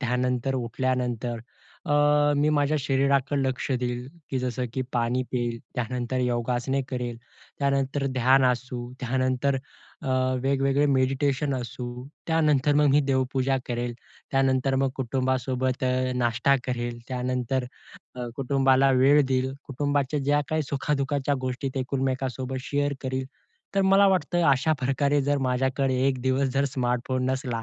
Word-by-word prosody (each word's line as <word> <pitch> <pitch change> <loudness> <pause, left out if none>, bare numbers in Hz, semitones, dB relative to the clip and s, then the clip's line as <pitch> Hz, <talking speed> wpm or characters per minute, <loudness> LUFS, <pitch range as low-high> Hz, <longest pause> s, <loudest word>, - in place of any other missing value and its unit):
त्यानंतर 125 0 0
उठल्यानंतर 125 -1 -2 0.5
अ, - - 0 0.4
मी 145 +1 +3
माझ्या 145 0 +2
शरीराकडे 140 +1 +1
लक्ष 130 +1 -2
देईल 125 0 -3 0.2
की 130 - 0
जसं 125 0 -2
की 130 - -1
पाणी 120 +1 +1
पिईल, 120 -2 -1 0.2
त्यानंतर 125 +1 -2
योगासने 125 +2 0
करेल, 125 -2 -3 0.4
त्यानंतर 140 0 0
ध्यान 130 +1 +3
असू, 125 0 0 0.2
त्यानंतर 130 +2 0 0.5
अ, - - -4 0.3
वेगवेगळे 135 +1 +2
मेडिटेशन 135 +1 +1
असू, 125 0 -5 0.4
त्यानंतर 150 -3 +2
मग 150 0 +4
मी 145 - +5
देवपूजा 130 0 +1
करेल, 120 0 -3 0.4
त्यानंतर 135 0 +2
मग 135 - +2
कुटुंबासोबत 130 0 -1
अ, 130 0 +1
नाष्टा 120 +3 +2
करेल, 120 -1 -3
त्यानंतर 125 0 -1 0.5
अ, 125 -1 -5
कुटुंबाला 135 0 +3
वेळ 145 +3 +6
देईल, 130 0 0 0.2
कुटुंबाच्या 145 +1 0
ज्या 145 +2 +2
काही 155 0 0
सुखा-दुखाच्या 140 0 -1
गोष्टी 130 +1 -3
ते 135 - -1
एकमेकांसोबत 130 0 -2
शेअर 145 0 0
करील. 130 0 -2 0.5
तर 195 - +3
मला 195 +1 +5
वाटतं 175 -2 +1
अशा 140 +4 +2
प्रकारे 140 +2 +1
जर 145 +1 +1
माझ्याकडे 130 +1 +1
एक 130 -2 0
दिवस 130 +1 +1
जर 135 +1 +2
स्मार्टफोन 125 -1 -1
नसला, 130 -4 -2
130 Hz, 135 wpm, -26 LUFS, 125-140 Hz, 0.5 s, वेळ